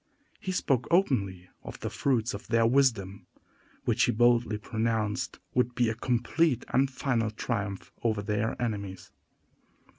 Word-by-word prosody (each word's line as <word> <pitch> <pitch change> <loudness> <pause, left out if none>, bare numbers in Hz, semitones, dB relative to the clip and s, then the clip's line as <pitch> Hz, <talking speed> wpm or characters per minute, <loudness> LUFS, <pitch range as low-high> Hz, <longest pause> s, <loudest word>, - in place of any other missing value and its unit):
He 185 - -3
spoke 135 -8 +1
openly 100 - +1
of - - -9
the - - -3
fruits 125 -4 0
of 100 - -7
their 115 -1 +3
wisdom, 115 -7 +2 0.6
which - - +3
he - - +2
boldly 120 -1 +3
pronounced 110 -1 -1 0.2
would 125 -1 +1
be 120 -2 +2
a - - 0
complete 125 +4 +1
and 135 +1 +3
final 130 -4 0
triumph 105 -3 -4
over 110 -3 0
their 105 +2 -1
enemies. 100 -5 -4
115 Hz, 140 wpm, -29 LUFS, 105-125 Hz, 0.6 s, their